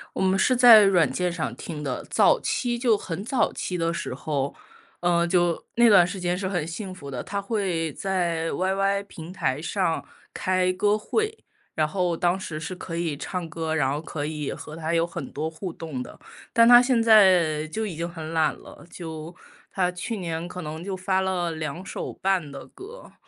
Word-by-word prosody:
我 - - -2
们 190 0 +3
是 255 +6 +3
在 240 -3 +9
软 190 -4 +4
件 180 -1 -1
上 170 -2 -3
听 155 -3 -7
的， 135 -4 -3
早 - - +4
期 240 -1 -1
就 235 -3 +3
很 185 -1 -5
早 245 +3 +1
期 180 - -3
的 165 0 0
时 170 - -4
候， 140 0 -2 0.5
呃， 170 -1 +2
就 175 -1 +1
那 235 0 +6
段 190 -5 +7
时 180 +2 -5
间 180 0 -1
是 190 0 -2
很 175 -5 -2
幸 185 +3 -6
福 145 -6 -10
的。 125 -3 -5
他 200 0 -3
会 190 -7 -1
在 170 -3 -1
YY 195 +2 0
平 165 -2 -9
台 145 -6 -1
上 170 -1 -1 0.3
开 185 -1 +1
歌 205 +3 +2
会， 440 - -2 0.3
然 155 -1 +2
后 175 0 -1
当 175 +2 +1
时 165 -5 -6
是 175 +4 -5
可 170 -2 -6
以 165 -3 -1
唱 175 +4 -4
歌， 160 -1 -3
然 145 -4 +1
后 145 +2 -2
可 155 -2 -5
以 150 -1 -3
和 155 - -8
他 160 0 -3
有 165 0 +2
很 170 - -7
多 155 +2 -3
互 165 +3 -6
动 155 -6 -6
的， - - -13 0.3
但 230 -1 +5
他 240 0 +9
现 250 -2 +2
在 185 -9 +5
就 220 +8 -3
已 190 -6 -5
经 170 +2 -3
很 165 -2 -7
懒 160 -2 +2
了， - - -14
就 160 -1 -7 0.4
他 180 -2 +1
去 215 +5 -4
年 165 -3 -4
可 180 +1 -7
能 155 +1 -6
就 195 0 -4
发 190 0 0
了 180 -3 -1
两 160 +3 -5
首 - - -5
半 185 -6 -1
的 135 0 -9
歌。 455 +6 -12
175 Hz, 220 characters per minute, -25 LUFS, 160-195 Hz, 0.5 s, 在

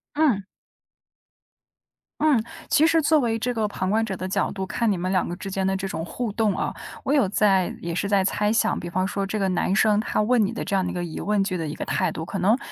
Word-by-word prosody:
嗯。 290 -10 +3 1.8
嗯， 295 -7 +4 0.3
其 315 - +4
实 330 0 +4
作 310 0 +3
为 230 -3 0
这 245 +2 -1
个 220 -2 0
旁 185 -2 -2
观 220 +2 +2
者 195 -4 -4
的 185 - -4
角 190 - 0
度， 190 -1 -4
看 230 +3 0
你 195 - 0
们 185 +2 -2
两 185 - +1
个 175 - -4
之 195 - -7
间 195 0 -1
的 190 0 +1
这 195 0 -3
种 165 -4 -4
互 230 +5 -4
动 210 -2 +1
啊， - - -2 0.3
我 275 - 0
有 270 -9 +3
在 195 -2 +2
也 170 0 -4
是 200 +3 -1
在 200 -2 +3
猜 210 +2 +1
想， 225 0 +2
比 175 - -6
方 185 +2 0
说 195 0 -2
这 215 +2 -2
个 195 -2 +1
男 185 +1 0
生， 210 0 +4
他 220 - -1
问 225 +1 +3
你 200 - -2
的 235 - -4
这 200 - -2
样 190 - +2
的 - - -2
一 - - -4
个 175 -1 -2
疑 165 - -6
问 205 -1 +1
句 185 -2 -2
的 160 -3 -3
一 150 - -5
个 - - -4
态 185 -2 0
度， 160 0 -5
可 195 - -4
能 210 +7 +3
200 Hz, 290 characters per minute, -24 LUFS, 185-225 Hz, 1.8 s, 嗯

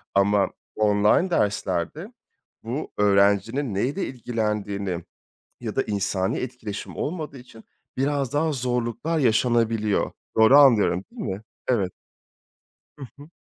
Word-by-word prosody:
Ama 100 0 +3 0.3
online 105 - +3
derslerde 105 - -1 0.5
bu 125 +7 -4
öğrencinin 105 +5 +2
neyle 135 - -1
ilgilendiğini 105 -7 -3 0.6
ya - - -5
da - - +3
insani 95 -2 -1
etkileşim 115 -5 -6
olmadığı 155 -4 -4
için 120 -3 -15 0.3
biraz 140 -1 0
daha 155 +2 +1
zorluklar 125 +4 -1
yaşanabiliyor. 115 -4 +2 0.2
Doğru 110 +6 +7
anlıyorum, 110 -9 +5
değil - - -8
mi? 95 +2 -4 0.3
Evet. 100 -8 +1 1.0
Hı 140 - -8
hı. 145 +2 -12
115 Hz, 105 wpm, -24 LUFS, 100-135 Hz, 1.0 s, Doğru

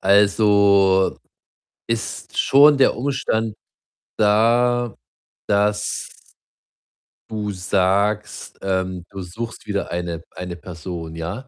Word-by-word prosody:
Also 100 -1 +4 0.7
ist 115 -1 -4
schon 145 +1 +6
der 130 - +4
Umstand 120 -5 -1 0.6
da, 120 +2 +2 0.5
dass 105 0 0 1.2
du 105 -2 -3
sagst, 100 +3 -1
ähm, 95 -2 -2
du 95 -1 -7
suchst 110 +6 -7
wieder 100 -1 -3
eine 85 -1 -3
eine 90 -1 -7
Person, 85 -2 -8
ja, 95 +11 -6
100 Hz, 90 wpm, -21 LUFS, 95-110 Hz, 1.2 s, schon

